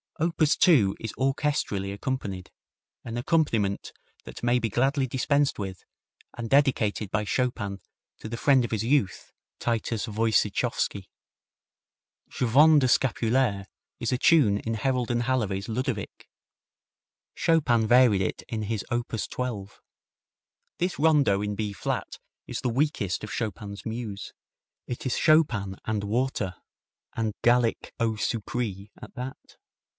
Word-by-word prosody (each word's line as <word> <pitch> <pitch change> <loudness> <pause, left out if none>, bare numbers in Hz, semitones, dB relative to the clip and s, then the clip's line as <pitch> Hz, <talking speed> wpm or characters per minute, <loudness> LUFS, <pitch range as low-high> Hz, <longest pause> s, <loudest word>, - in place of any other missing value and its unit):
Op. 165 +1 0
2 145 - +4
is 110 - -5
orchestrally 135 -8 0
accompanied, 100 -5 -4 0.5
an 115 0 -5
accompaniment 120 -8 0 0.3
that - - -10
may 120 +1 +3
be 115 -1 -1
gladly 135 +4 +1
dispensed 140 +3 +1
with, 95 -2 -6 0.5
and 120 -1 -4
dedicated 120 -7 +2
by 105 +1 0
Chopin 105 -4 -2 0.4
to 110 - -7
the 115 - -4
friend 135 0 +4
of - - -5
his 110 -2 -1
youth, 125 -5 0 0.3
Titus 115 -1 -1
Woyciechowski. 110 -1 0 1.2
Je - - -2
Vends 150 +6 +6
des 130 - +2
Scapulaires 120 -5 +1 0.3
is - - -1
a 125 - +1
tune 125 -9 +4
in 115 +1 -3
Herold 125 +1 0
and 120 0 +1
Halevy's 105 -6 -1
"Ludovic." 120 -2 -4 1.1
Chopin 125 -9 +2
varied 120 -5 +5
it 95 - -2
in 110 -2 -3
his 105 0 -2
op. 120 0 -1
12. 110 -3 -4 1.0
This 180 -2 -2
rondo 145 -10 +4
in 105 0 -2
B 105 -1 -3
flat - - -3 0.3
is - - -4
the 125 - 0
weakest 120 - 0
of 110 - -6
Chopin's 105 -2 -5
muse. 110 -3 -5 0.5
It 125 - -5
is 130 - 0
Chopin 120 - +3
and 110 -2 -1
water, 105 -3 -1 0.6
and 110 -2 -1
Gallic 120 -1 +2
eau 115 -1 +1
sucree 105 -2 -3
at - - -11
that. 130 +1 -8
115 Hz, 130 wpm, -26 LUFS, 105-130 Hz, 1.2 s, Vends